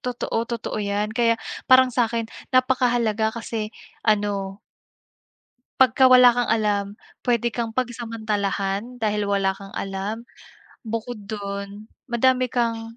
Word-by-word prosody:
totoo, 245 -2 -3
totoo 235 -1 -4
'yan 205 +1 -1
kaya 230 0 +2 0.3
parang 255 -1 +6
sa'kin 230 -1 0 0.2
napakahalaga 245 -4 +2
kasi 225 -1 -4 0.3
ano 205 -2 0 1.2
Pagka 260 0 +5
wala 250 -1 +8
kang 245 -1 0
alam, 210 -3 +1 0.4
puwede 235 -1 0
kang 230 -2 -2
pagsamantalahan 225 -2 -2
dahil 210 -1 0
wala 195 -1 +1
kang 195 0 -11
alam. 200 +4 -4 0.5
Bukod 225 -2 -6
dun, 200 0 -6 0.2
madami 255 +2 +2
kang 230 -1 -2
225 Hz, 110 wpm, -23 LUFS, 205-240 Hz, 1.2 s, wala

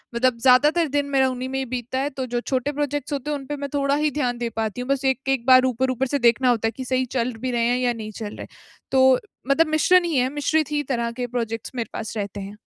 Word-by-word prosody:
मतलब 245 0 +2
ज़्यादातर 295 +7 +4
दिन 285 - +1
मेरा 265 -1 +3
उन्हीं 255 0 -4
में 265 - -3
ही 265 - -2
बीतता 255 +1 -4
है। 280 - 0
तो 265 -2 -5
जो 240 - +1
छोटे 260 +2 -1
प्रोजेक्ट्स 290 0 -3
होते 285 +1 -3
हैं, 290 - -1
उनपे 280 +2 -6
मैं 280 - -3
थोड़ा 280 0 +1
ही 300 0 +1
ध्यान 250 -4 -1
दे 235 -1 -2
पाती 220 +2 -2
हूँ। 250 - -7
बस 275 0 0
एक-एक 265 -2 0
बार 255 0 +7
ऊपर-ऊपर 255 +1 0
से 285 +2 -1
देखना 245 +2 +3
होता 225 -2 +2
है, - - -1
कि 260 +2 -7
सही 255 0 0
चल 245 0 -2
भी 255 - -2
रहे 235 -1 +1
हैं 245 - +2
या 245 -1 +1
नहीं 215 -1 -7
चल 210 -1 -7
रहे। - - -8 0.4
तो 260 -1 +5 0.3
मतलब 315 +3 +4
मिश्रण 350 +4 +4
ही 330 - -1
है 255 +1 +2
मिश्रित 300 0 0
ही 295 0 0
तरह 235 -2 -1
के 245 +1 -4
प्रोजेक्ट्स 230 -2 -4
मेरे 230 -3 -3
पास 220 0 -5
रहते 205 0 -4
हैं। 200 +2 -8
255 Hz, 260 wpm, -23 LUFS, 240-280 Hz, 0.4 s, बार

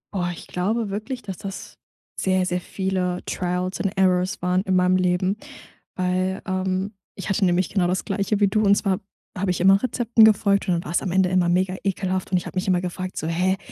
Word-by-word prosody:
Oh, 175 -2 0
ich 170 - -9
glaube 205 +4 -1
wirklich, 230 +5 -4
dass 190 -4 -6
das 195 -1 -8 0.4
sehr, 185 -1 +1
sehr 180 0 -1
viele 185 -1 -2
trials 180 +1 -2
and 195 -1 -2
errors 185 -1 +2
waren 180 +1 +2
in 190 -1 0
meinem 180 0 +4
Leben, 185 +2 +1 0.6
weil, 185 +1 -1
ähm 185 +2 -1 0.2
Ich 195 - -6
hatte 195 +1 +2
nämlich 180 0 +2
genau 180 -3 +1
das 180 +1 -1
Gleiche 200 0 -1
wie 205 - +4
du 215 +2 +1
und 200 -1 +5
zwar 195 -2 +1
hab - - -4 0.3
habe 195 0 -1
ich 180 - 0
immer 195 +2 +6
Rezepten 240 -3 +3
gefolgt, 200 -2 +3
und 180 - +2
dann 170 - -2
war's 170 +3 0
am 190 - -3
Ende 185 0 +3
immer 180 -1 +2
mega 185 +1 +1
ekelhaft 190 -1 -1
und 185 - +3
ich - - -3
habe - - -7
mich 185 - -1
immer 180 -1 +2
gefragt 185 +1 -5
so: - - -3
„Hä, 180 +4 +1
185 Hz, 220 wpm, -23 LUFS, 180-195 Hz, 0.6 s, immer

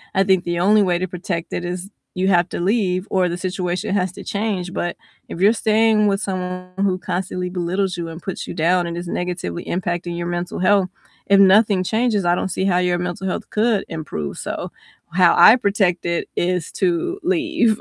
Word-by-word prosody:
I 195 - +4
think 190 -2 +2
the 175 0 -2
only 210 +3 +4
way 180 -2 +1
to 185 - -2
protect 175 -1 -5
it 180 - -2
is 180 +2 -5 0.3
you 185 +1 0
have 175 -2 +3
to - - -4
leave 190 -1 0
or 185 -2 +2
the 175 0 -3
situation 180 0 -2
has 185 -2 0
to - - -9
change, 200 -4 -2
but 175 -1 -3 0.3
if 170 - -7
you're 205 +3 +6
staying 220 -1 +3
with 200 +1 +1
someone 180 -1 -4
who 195 -2 +1
constantly 180 -1 -3
belittles 180 +1 -1
you 170 -1 -4
and 165 +1 -8
puts 190 - -5
you - - -5
down 175 +2 +2
and 170 - -4
is 175 0 -5
negatively 175 - -4
impacting 175 -1 -3
your 170 - -3
mental 175 +1 -3
health, 190 0 +3 0.4
if 200 0 +5
nothing 195 0 +5
changes, 220 0 +1
I 175 0 +3
don't 190 - -2
see 190 - -1
how 180 -2 +2
your 180 -1 +1
mental 180 +1 -4
health 185 - -4
could 215 -2 +1
improve, 155 - -5
so - - -5 0.4
how 175 -1 +4
I 220 - +9
protect 200 -6 0
it 170 0 -1
is 180 -2 -1
to 185 - 0
leave. 325 - +1
185 Hz, 200 wpm, -20 LUFS, 175-200 Hz, 0.4 s, I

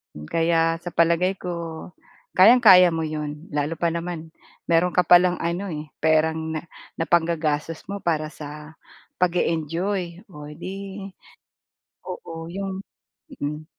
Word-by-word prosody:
Hmm, 75 0 -9
kaya 165 0 +2
sa 175 +1 -8
palagay 170 +3 +3
ko, 170 -2 -5 0.5
kayang-kaya 185 -5 +8
mo 165 - -1
'yon, 150 0 -5
lalo 145 +2 -1
pa 170 +1 0
naman, 170 -1 -5 0.4
meron 170 +2 +3
ka - - +4
palang 180 +1 +5
ano 170 +4 -2
eh, 150 0 -6
perang 160 +1 +1
na 155 - -3 0.4
napanggagastos 165 -2 0
mo 200 - -3
para 155 -5 -1
sa 150 +1 -10 0.4
pag-e-enjoy 175 +1 -1
oh, 150 -3 -10
'di, 195 +4 -7 1.0
oo, 165 - -7
yung 195 +1 -4 0.6
mm. 150 +2 -4
165 Hz, 120 wpm, -23 LUFS, 155-180 Hz, 1.0 s, kayang-kaya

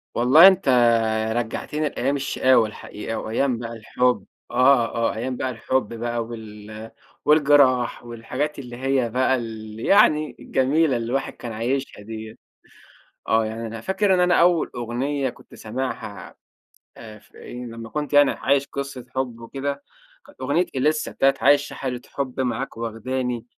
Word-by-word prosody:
والله 135 +9 +8
أنت 190 -7 +3 0.7
رجّعتني 145 +6 -2
لأيام 135 +3 -1
الشقاوة 130 -4 +3
الحقيقة 105 +1 -7
وأيام 120 +3 -1
بقى 115 -1 -5
الحُب، 125 +3 0 0.3
آه، 125 -1 +5
آه، 115 0 0
أيام 125 +3 -3
بقى 130 - -2
الحُب 125 -1 -2
بقى 120 0 -3
وال 110 -1 -9 0.3
والجِراح 140 -6 +4
والحاجات 125 +6 -4
اللي 120 -3 -8
هي 130 -2 0
بقى 130 +3 +2
ال 110 -2 -7
يعني 155 - +3
الجميلة 135 +1 +1
اللي 115 - -3
الواحد 135 +3 -2
كان 120 - -8
عايشها 120 +2 -3
دِيّة. 110 +1 -8 0.9
آه 110 0 +3
يعني 115 +1 -5
أنا 115 0 -7
فاكر 190 - +1
إن 180 - +2
أنا 180 0 +4
أول 170 -1 +3
أغنية 130 +3 -2
كنت 120 - -18
سامعها 110 -4 -6 0.6
آآ، 110 -1 -11
فإيه، 125 +4 -10
لمّا 115 -1 -8
كنت 150 +2 -4
يعني 145 -1 +6
عايش 140 0 +1
قِصّة 140 -3 -6
حُب 125 -3 -2
وكده 140 +4 -5 0.4
كانت 290 - -18
أغنية 145 +7 +1
إليسا 150 +4 0
بتاعة 135 0 +3
"عايشة 145 +1 +3
حالة 125 -2 -4
حُب 135 -2 -4
معاك 130 -1 -2
واخداني 120 +1 -3
125 Hz, 145 wpm, -23 LUFS, 115-140 Hz, 0.9 s, والله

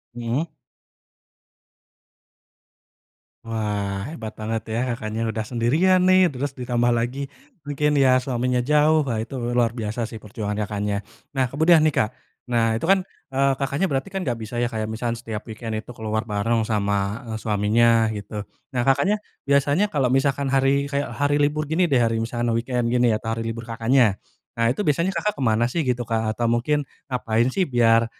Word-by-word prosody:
Mhm. 120 +7 -2 2.9
Wah, 105 -3 -2
hebat 125 -7 -7
banget 110 +1 -2
ya 110 +1 -1
Kakaknya, 110 -1 -3
udah 110 -1 -2
sendirian 125 - +2
nih, 185 -1 +5
terus 140 0 -4
ditambah 120 -2 0
lagi, 120 +4 -1 0.4
mungkin 145 +1 +1
ya 130 -2 +5
suaminya 125 -1 0
jauh, 150 +4 +4
wah 125 -6 -2
itu 110 +5 -5 0.2
luar 120 -1 +2
biasa 115 0 -3
sih 110 -1 -9
perjuangan 105 0 -4
Kakaknya. 105 -1 -2 0.3
Nah, 130 -3 +1
kemudian 160 +4 +5
nih, 155 - +4
Kak. 105 - +3 0.4
Nah, 115 -2 +1
itu 115 - -3
kan, 190 +2 +4 0.3
eee, 135 +1 +3
Kakaknya 140 +7 -1
berarti 135 +7 -2
kan, 195 - -2
gak 125 -9 -2
bisa 115 +2 -4
ya, 120 - +1
kayak, 110 -2 -3
misalkan 115 +1 -2
setiap 110 -2 -5
weekend 110 +1 -5
itu 110 +2 -5
keluar 110 -2 -2
bareng 110 +3 +1
sama, 100 +2 -1
eee, - - -2
suaminya, 110 +2 +3
gitu? 105 0 -6 0.3
Nah, - - +3
Kakaknya 190 +10 +3 0.3
biasanya 145 +8 +3
kalau 130 -6 +1
misalkan 135 +1 +1
hari, 135 +1 +3
kayak, 140 -1 -2
hari 145 +5 +1
libur 150 +1 +1
gini 165 +4 +1
deh, 135 - +3
hari 115 -1 +1
misalkan 120 +1 -1
weekend 120 0 -1
gini 125 -1 +3
ya, 110 - +2
hari 115 0 -2
libur 115 0 -4
Kakaknya. 115 -2 +2 0.3
Nah, 115 0 +1
itu 195 - -1
biasanya 170 +5 +2
Kakak 210 +5 0
kemana 120 - +1
sih? 125 +8 -1
Gitu 125 -4 -1
Kak 110 -1 -1
atau 120 - 0
mungkin 125 +6 +1 0.2
ngapain 120 -1 +1
sih 185 +8 0
biar, 115 -4 +4
120 Hz, 170 wpm, -23 LUFS, 110-140 Hz, 2.9 s, nih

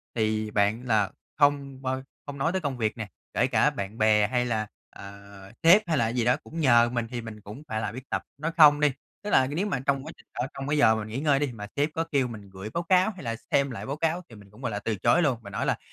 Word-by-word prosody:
thì 110 -1 0
bạn 105 +4 +1
là 110 -5 +1 0.3
không 140 -2 +1
bao 130 0 -2 0.2
không 140 -1 -7
nói 160 +5 +1
tới 190 0 -1
công 140 -4 -3
việc 110 0 -1
nè, 110 -2 -5 0.3
kể - - +2
cả - - +3
bạn 100 +3 -6
bè 105 -1 +4
hay 125 +2 0
là, 110 -3 -1 0.2
ờ, 100 0 -11 0.5
sếp 180 +6 +8
hay 160 -3 +1
là 115 -1 +2
gì 120 -1 -1
đó 125 - +4
cũng 165 - -8
nhờ 120 -5 +5
mình 120 -1 -2
thì 120 -1 -3
mình 110 -2 -9
cũng 105 +9 -10
phải 110 -2 -3
biết 130 +2 -9
tập - - -1 0.2
nói 155 +3 -2
không 145 -2 +8
đi. 150 -1 +3 0.3
Tức 210 - -4
là 130 - +5
c - - -6
nếu 170 +7 -1
mà 155 -10 -1
trong 135 -1 +1
quá 160 - -7
trình - - -20
ở 125 - -2
trong 135 0 -6
cái 150 +1 +1
giờ 110 -6 +5
mà - - -2
mình 105 - -8
nghỉ 120 +5 -3
ngơi 145 -2 +2
đi, 145 -3 -1
mà 105 -3 -8
sếp 145 +2 +1
có 165 - 0
kêu 135 -3 +2
mình 105 -4 -10
gửi 95 +3 -8
báo 170 0 -2
báo 185 +3 +4
hay 180 - -10
là 115 -1 -2 0.2
xem 140 -1 +2
lại 115 - -6
báo 140 +2 -3
cáo 165 +2 0
thì 115 - -13
mình 100 -1 -15
cũng, 110 +5 -16
gọi 125 - -2
là, 105 - -3
từ 110 +1 -2
chối 170 - +3
luôn, 135 -7 +2
và 100 - -10
nói 100 - -3
là - - +1
125 Hz, 290 wpm, -27 LUFS, 110-145 Hz, 0.5 s, sếp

